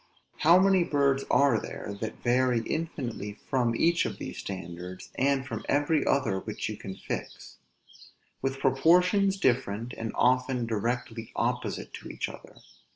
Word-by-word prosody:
How 170 Hz, +3 st, +6 dB
many 190 Hz, -1 st, +5 dB
birds 140 Hz, -4 st, +2 dB
are 140 Hz, -5 st, +4 dB
there 100 Hz, -, -6 dB
that 110 Hz, -, -5 dB
vary 125 Hz, -1 st, +3 dB
infinitely 125 Hz, -10 st, -4 dB
from 120 Hz, +1 st, -1 dB
each 170 Hz, +6 st, +3 dB
of -, -, -6 dB
these -, -, -6 dB
standards, 90 Hz, -1 st, -7 dB
and 135 Hz, 0 st, +1 dB
from 115 Hz, -4 st, -5 dB
every 145 Hz, +1 st, +2 dB
other 115 Hz, -9 st, +2 dB
which 110 Hz, +2 st, -4 dB
you 110 Hz, -, -4 dB
can 95 Hz, -2 st, -7 dB
fix; -, -, -7 dB, 0.8 s
with 135 Hz, 0 st, -1 dB
proportions 180 Hz, +9 st, +4 dB
different, 120 Hz, -, 0 dB
and 115 Hz, 0 st, -4 dB
often 125 Hz, 0 st, +2 dB
directly 115 Hz, 0 st, -3 dB
opposite -, -, -2 dB
to -, -, -8 dB
each -, -, -3 dB
other! -, -, -12 dB
130 Hz, 145 wpm, -28 LUFS, 115-145 Hz, 0.8 s, How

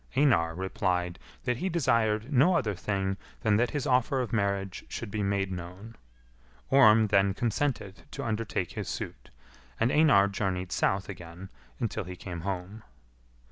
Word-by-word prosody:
Einar 85 Hz, -, +3 dB
replied 90 Hz, -2 st, -1 dB, 0.2 s
that 125 Hz, -1 st, 0 dB
he 190 Hz, -, -1 dB
desired 115 Hz, -6 st, +1 dB
no 145 Hz, +8 st, +5 dB
other 115 Hz, -10 st, +1 dB
thing 95 Hz, +1 st, -2 dB, 0.2 s
than 105 Hz, -2 st, +3 dB
that 120 Hz, +2 st, +2 dB
his 145 Hz, -2 st, -3 dB
offer 130 Hz, 0 st, +2 dB
of 125 Hz, -1 st, -3 dB
marriage 100 Hz, -3 st, -1 dB
should 115 Hz, -4 st, -5 dB
be 105 Hz, -, -2 dB
made 100 Hz, -1 st, 0 dB
known. 90 Hz, +5 st, -8 dB, 0.8 s
Orm 115 Hz, -5 st, +7 dB
then 100 Hz, -1 st, +3 dB
consented 115 Hz, -5 st, -2 dB
to -, -, -6 dB
undertake 115 Hz, -1 st, -2 dB
his -, -, -5 dB
suit, -, -, -6 dB, 0.5 s
and 115 Hz, +3 st, +2 dB
Einar 145 Hz, -11 st, +5 dB
journeyed 95 Hz, -3 st, -2 dB
south 95 Hz, +1 st, +1 dB
again 90 Hz, 0 st, -9 dB, 0.3 s
until 110 Hz, -3 st, -2 dB
he 90 Hz, 0 st, -7 dB
came 90 Hz, -1 st, -7 dB
home. 95 Hz, +3 st, -4 dB
100 Hz, 150 wpm, -29 LUFS, 95-120 Hz, 0.8 s, Orm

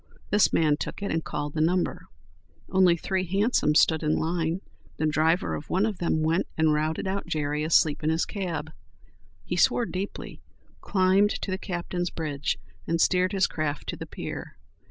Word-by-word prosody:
This 205 Hz, 0 st, +4 dB
man 150 Hz, -3 st, +3 dB
took 200 Hz, -, -5 dB
it, 200 Hz, -, -2 dB
and 165 Hz, 0 st, -1 dB
called 145 Hz, 0 st, -4 dB
the 155 Hz, -, -1 dB
number. 175 Hz, +3 st, 0 dB, 0.6 s
Only 185 Hz, -2 st, +5 dB
three 190 Hz, +2 st, -1 dB
hansoms 195 Hz, -4 st, +2 dB
stood 160 Hz, -1 st, +2 dB
in 155 Hz, -1 st, +1 dB
line. 165 Hz, +2 st, -1 dB, 0.4 s
The 155 Hz, -, 0 dB
driver 160 Hz, +3 st, +2 dB
of 150 Hz, -, -6 dB
one 190 Hz, +3 st, +2 dB
of 215 Hz, -4 st, -3 dB
them 160 Hz, -2 st, 0 dB
went 165 Hz, +4 st, +1 dB
and 160 Hz, -1 st, +3 dB
routed 155 Hz, +3 st, -1 dB
out 190 Hz, -1 st, -2 dB
Jerry 150 Hz, -2 st, -1 dB
asleep 155 Hz, -1 st, +3 dB
in 155 Hz, -, +2 dB
his 160 Hz, +1 st, +1 dB
cab. 165 Hz, -6 st, -4 dB, 0.7 s
He -, -, -2 dB
swore 240 Hz, -, +3 dB
deeply, 195 Hz, -1 st, -6 dB, 0.4 s
climbed 190 Hz, +2 st, +2 dB
to 195 Hz, -, -3 dB
the 190 Hz, -, -2 dB
captain's 175 Hz, -1 st, -3 dB
bridge 150 Hz, -4 st, -2 dB, 0.3 s
and 165 Hz, 0 st, 0 dB
steered 185 Hz, +1 st, +3 dB
his 195 Hz, -2 st, +3 dB
craft 150 Hz, -2 st, -3 dB
to -, -, -2 dB
the -, -, -8 dB
pier. -, -, -7 dB
165 Hz, 175 wpm, -26 LUFS, 155-190 Hz, 0.7 s, Only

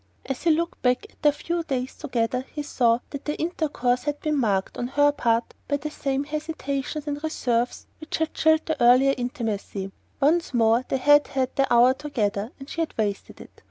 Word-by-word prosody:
As 270 Hz, -2 st, -4 dB
he 340 Hz, -, +2 dB
looked 335 Hz, +2 st, 0 dB
back 250 Hz, +7 st, +1 dB
at -, -, -31 dB
their 295 Hz, -, +5 dB
few 340 Hz, +4 st, -3 dB
days 265 Hz, -5 st, -3 dB
together 250 Hz, -3 st, -1 dB
he 295 Hz, -, -4 dB
saw 240 Hz, -4 st, +2 dB
that 280 Hz, -1 st, -7 dB
their 295 Hz, -, -1 dB
intercourse 295 Hz, -7 st, -1 dB
had 295 Hz, -1 st, -2 dB
been 305 Hz, -1 st, -1 dB
marked, 205 Hz, -8 st, 0 dB
on 245 Hz, -, -3 dB
her 290 Hz, +2 st, +3 dB
part, 230 Hz, -4 st, 0 dB
by 285 Hz, -, +1 dB
the 300 Hz, +1 st, -5 dB
same 275 Hz, -2 st, -1 dB
hesitations 300 Hz, -1 st, -4 dB
and 290 Hz, -1 st, -3 dB
reserves 245 Hz, -6 st, -1 dB
which 310 Hz, -, -4 dB
had 320 Hz, 0 st, -1 dB
chilled 315 Hz, 0 st, +3 dB
their 320 Hz, -, -1 dB
earlier 255 Hz, +3 st, +6 dB
intimacy. 215 Hz, -5 st, -4 dB, 0.3 s
Once 305 Hz, 0 st, +2 dB
more 230 Hz, +1 st, +4 dB
they -, -, +1 dB
had 290 Hz, +3 st, +5 dB
had 265 Hz, -1 st, -2 dB
their 275 Hz, -1 st, +2 dB
hour 240 Hz, +2 st, +6 dB
together 230 Hz, -6 st, -2 dB
and 270 Hz, -, -10 dB
she 335 Hz, -, -3 dB
had 325 Hz, -, -3 dB
wasted 205 Hz, -3 st, -3 dB
it. -, -, -13 dB
275 Hz, 195 wpm, -25 LUFS, 240-300 Hz, 0.3 s, earlier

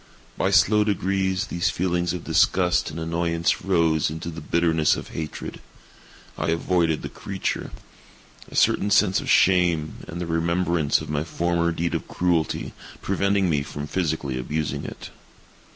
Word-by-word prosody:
By 95 Hz, -, +1 dB
slow 105 Hz, +2 st, +4 dB
degrees, 95 Hz, -2 st, 0 dB
these 85 Hz, 0 st, -1 dB
feelings 90 Hz, -1 st, 0 dB
of 90 Hz, -1 st, -5 dB
disgust 90 Hz, -2 st, +2 dB
and 75 Hz, +2 st, -6 dB
annoyance 85 Hz, 0 st, 0 dB
rose 85 Hz, -6 st, +2 dB
into 80 Hz, +2 st, -5 dB
the 80 Hz, 0 st, -8 dB
bitterness 80 Hz, -1 st, +2 dB
of -, -, -7 dB
hatred. 80 Hz, -2 st, -6 dB, 0.8 s
I -, -, -1 dB
avoided 85 Hz, -1 st, +1 dB
the -, -, -3 dB
creature; 95 Hz, -1 st, -4 dB, 0.8 s
a -, -, -11 dB
certain 100 Hz, -, +3 dB
sense 100 Hz, -2 st, +3 dB
of -, -, -6 dB
shame, 85 Hz, -4 st, +3 dB
and 85 Hz, -, -6 dB
the 90 Hz, -, -2 dB
remembrance 85 Hz, -1 st, +1 dB
of -, -, -8 dB
my 75 Hz, 0 st, 0 dB
former 85 Hz, +1 st, 0 dB
deed 85 Hz, +1 st, -2 dB
of -, -, -3 dB
cruelty, 85 Hz, -3 st, -1 dB, 0.3 s
preventing 100 Hz, 0 st, +1 dB
me 75 Hz, -4 st, +1 dB
from 70 Hz, +1 st, -6 dB
physically 75 Hz, -5 st, -2 dB
abusing 75 Hz, +4 st, -3 dB
it. -, -, -8 dB
85 Hz, 150 wpm, -24 LUFS, 80-90 Hz, 0.8 s, slow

